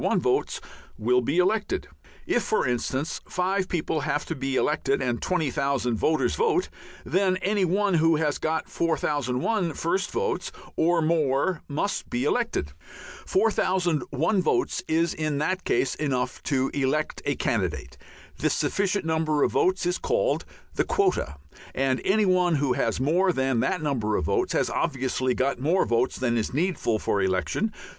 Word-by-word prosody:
1 - - +2
votes - - 0 0.4
will 125 +3 +2
be 140 +7 -1
elected. 210 - +1 0.4
If, 240 - +1
for 215 - 0
instance, 130 +4 -2
five 185 +1 0
people 160 -2 -1
have 145 0 -1
to - - -4
be 135 0 -2
elected 140 0 +1
and 120 -3 -1
20,000 140 -7 0
voters 155 +8 +1
vote, 435 -5 +1 0.4
then 185 -1 +2
any 195 +1 +1
one 195 +3 +1
who 165 0 +4
has 150 -2 0
got 160 0 -1
4001 155 - 0
first 185 +6 -1
votes 460 0 -2 0.2
or 165 0 +2
more 155 +1 +1
must 155 +8 -2
be 120 +1 -1
elected. 150 - 0 0.6
4001 185 - +1
votes 175 - 0
is 165 +1 +1
in 155 -2 -2
that 185 +6 -1
case 135 - +1
enough 130 -4 -2
to 135 -2 +1
elect 145 +2 -1
a - - 0
candidate. - - -2 0.4
This - - +1
sufficient 200 -2 0
number 160 -2 +1
of - - +2
votes 185 -1 +1
is 175 +1 0
called - - 0 0.3
the - - +1
quota, 385 - 0 0.4
and 130 0 +1
any 210 +2 +3
one 180 -2 +3
who 140 -3 +1
has 115 -2 0
more 175 +8 +3
than 130 -5 0
that 180 +5 0
number 115 -8 0
of - - -1
votes - - 0
has - - +2
obviously 130 -4 0
got 135 0 0
more 165 +8 +2
votes 120 +2 +1
than 120 -2 0
is 110 - -3
needful 160 -9 0
for 100 -1 0
election. 95 - 0
155 Hz, 155 wpm, -26 LUFS, 130-185 Hz, 0.6 s, who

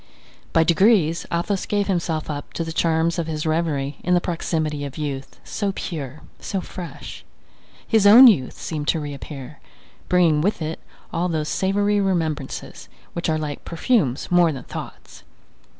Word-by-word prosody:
By 165 - +4
degrees 170 -1 +3
Athos 185 +3 -1
gave 205 -1 +1
himself 170 -5 -1
up 145 -2 -6
to 165 - -2
the 165 0 -5
charms 165 +1 +1
of 165 - -2
his 155 -1 -3
reverie 155 -4 -1
in 180 - +3
the - - +4
proximity 160 -4 -2
of 140 0 -6
youth, 140 -3 -5
so 200 -2 -2
pure, 150 -4 -5 0.2
so 195 - -3
fresh. 180 -2 -8 0.6
His 220 -3 +4
own 235 +6 +10
youth 180 - +5
seemed 150 -2 -4
to 165 - +2
reappear, 145 -1 -7 0.5
bringing 170 -4 +4
with 200 +6 0
it 160 0 -4 0.3
all 175 +2 0
those 155 -2 -1
savoury 205 +2 +1
remembrances, 160 -8 -2 0.2
which 170 -1 -2
are 155 - +2
like 150 -2 -5
perfumes 170 - 0
more 175 -2 +5
than 135 -4 -6
thoughts. - - -9
165 Hz, 155 wpm, -22 LUFS, 150-180 Hz, 0.6 s, own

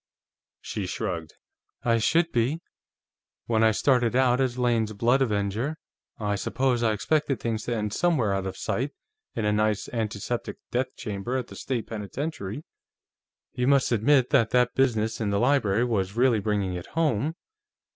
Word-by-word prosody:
She 100 -3 -4
shrugged. 90 -5 -4 0.5
"I 115 -1 +3
should 165 +9 +2
be. 125 +7 +1 0.9
When 110 -1 +2
I 110 - +6
started 120 +1 +2
out 130 0 +3
as 125 -2 0
Lane's 115 -3 +1
blood 120 +6 +2
avenger, 110 +5 0 0.4
I 105 -2 -1
suppose 125 +4 0
I 115 -2 +3
expected 145 +5 0
things 110 -2 -2
to 120 - -1
end 105 -1 -2
somewhere 145 - +2
out 95 -1 -1
of 95 - -5
sight, 135 +4 -2 0.4
in 110 - -1
a 105 - +2
nice, 105 -1 +1
antiseptic 110 0 -3
death 125 +1 -1
chamber 110 +4 -3
at 130 - -4
the - - -10
state 125 -4 -3
penitentiary. 110 +2 -5 0.9
You 125 0 -1
must 140 -2 +3
admit 125 +3 +3
that 115 -5 +4
that 125 0 +2
business 115 -5 +1
in 105 - 0
the 100 0 +1
library 120 -5 +2
was 100 -4 -1
really 120 -3 +4
bringing 100 -2 -1
it 90 -1 -6
home. 155 -2 0
115 Hz, 160 wpm, -26 LUFS, 105-130 Hz, 0.9 s, I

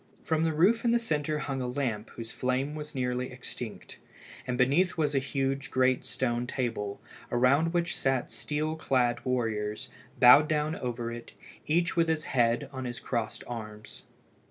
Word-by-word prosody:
From 160 0 +1
the 165 - +2
roof 185 +9 +3
in 240 - +3
the 235 - +4
centre 155 -9 -1
hung 135 -2 -3
a 125 - -2
lamp 125 -5 -2
whose 115 -1 -8
flame 130 +3 -1
was 150 -1 -7
nearly 125 0 -1
extinct, - - -8 0.5
and 125 -1 -1
beneath 145 +9 +3
was 150 -2 +1
a 135 - +3
huge 135 0 -2
great 130 0 +2
stone 120 -1 -1
table, 115 -6 -3 0.3
around 135 +7 +3
which 170 -1 0
sat 135 -2 0
steel 155 +1 -2
clad 120 -6 +1
warriors, 110 -4 -1 0.3
bowed 135 +5 +8
down 155 +1 0
over 120 -1 -3
it, 120 0 -8 0.3
each 170 +3 +2
with 165 -1 +3
his 160 -1 0
head 120 +2 +2
on 130 -1 -5
his 120 -1 -4
crossed 115 -4 -3
arms. 110 -3 -8
130 Hz, 165 wpm, -29 LUFS, 120-150 Hz, 0.5 s, bowed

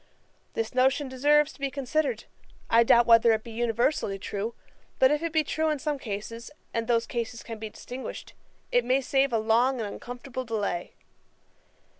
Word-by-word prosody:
This 225 -1 -2
notion 265 +2 +2
deserves 295 +3 +3
to - - -19
be 275 0 -1
considered; 290 - -1 0.5
I 230 +1 +6
doubt 235 +1 +5
whether 230 -1 +6
it 220 0 -1
be 235 - -9
universally 235 -2 0
true; 205 +4 -4 0.4
but 260 +1 +5
if 295 +1 +1
it 335 -1 -2
be 315 0 +2
true 315 +1 0
in 305 - 0
some 290 0 -2
cases, 230 +1 -6 0.2
and 230 -1 -1
those 235 -1 +2
cases 235 -1 -4
can 225 -2 -7
be 220 0 -5
distinguished, 250 +4 -8 0.4
it - - +3
may 260 +2 +2
save 270 0 +2
a 230 - +2
long 235 +4 +2
and 220 - -2
uncomfortable 245 +4 -6
delay. 205 -7 -3
245 Hz, 175 wpm, -27 LUFS, 225-275 Hz, 0.5 s, I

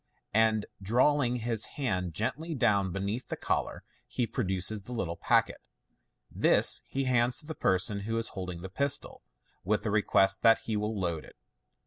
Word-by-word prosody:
and 110 -1 +3 0.2
drawing 125 +5 +2
his 115 -2 0
hand 90 - -2
gently 155 +9 -3
down 100 -7 +2
beneath 100 +6 -3
the - - -4
collar, - - -2 0.2
he 115 - -1
produces 95 -1 -1
the - - -9
little 95 -9 -3
packet. - - +1 0.7
This - - +3
he 135 - -1
hands 125 -1 +2
to - - -6
the 160 - -5
person 95 -5 +1
who 115 +3 -3
is 115 - -1
holding 90 -3 -6
the 95 - -6
pistol, 140 +9 0 0.4
with 105 +4 0
a 105 - 0
request 95 -2 +2
that 115 0 +5
he 110 - -2
will 105 0 -2
load 85 -4 -2
it. - - -15
110 Hz, 165 wpm, -29 LUFS, 95-120 Hz, 0.7 s, that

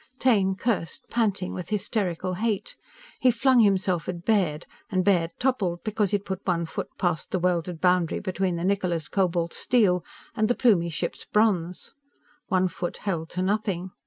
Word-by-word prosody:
Taine 200 -8 +3
cursed, 190 -5 -2
panting 205 -6 0
with 180 -2 -6
hysterical 190 -4 -1
hate. 210 +1 -2 0.4
He 255 - +4
flung 250 +2 +4
himself 190 -5 +2
at 175 -1 -5
Baird, 180 -8 +1 0.2
and 185 -2 0
Baird 175 -5 +3
toppled 200 -10 0
because 215 -2 0
he'd 205 +1 -1
put 190 0 -4
one 170 -3 0
foot 160 - -5
past 175 -4 -1
the - - 0
welded 175 -1 -1
boundary 180 -2 +2
between 190 -2 -1
the 170 - -3
Niccola's 180 -6 0
cobalt 175 -2 0
steel 195 -8 +2 0.3
and 215 -2 +2
the 245 - +1
Plumie 190 -9 +3
ship's - - -4
bronze. 185 -5 0 0.5
One 185 0 +2
foot 175 0 -5
held 170 -5 -3
to 185 - +1
nothing. 190 -2 -1
185 Hz, 160 wpm, -26 LUFS, 175-210 Hz, 0.5 s, He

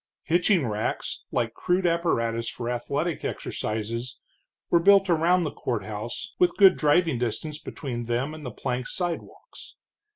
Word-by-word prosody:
Hitching 175 -1 +3
racks, 110 -1 -3
like 115 -1 0
crude 180 +6 0
apparatus 115 -10 +1
for 120 - -6
athletic 140 +7 -2
exercises, 115 +3 -4 0.5
were 170 - +6
built 195 +1 +5
around 170 +2 +3
the - - -3
courthouse, - - -4
with 360 -1 +3
good 195 -2 +8
driving 155 -2 +2
distance 125 +6 -3
between 120 -7 -5
them 120 +6 -1
and 155 -1 -9
the 125 - -4
plank 125 +1 -3
sidewalks. 175 - -6
150 Hz, 135 wpm, -26 LUFS, 120-175 Hz, 0.5 s, good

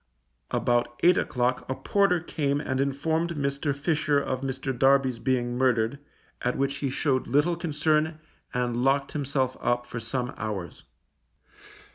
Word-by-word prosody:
About 120 0 0
eight 180 +1 +7
o'clock 125 0 0
a 130 - -1
porter 195 0 +2
came 145 -4 -1
and 130 -2 -1
informed 160 +4 0
Fisher 140 +2 0
of 130 -2 -2
Mr. 135 0 -3
Darby's 135 -1 +3
being 120 -2 0
murdered, 125 0 +1 0.4
at 125 - 0
which 140 0 0
he 140 - -1
shewed 130 0 0
little 145 +7 +2
concern 155 -1 +1 0.3
and 125 -1 -1
locked 135 +1 +2
himself 135 -3 -1
up 120 0 +1
for 120 -1 -6
some 125 +3 -3
hours. 105 -5 -5
135 Hz, 135 wpm, -27 LUFS, 125-145 Hz, 0.4 s, eight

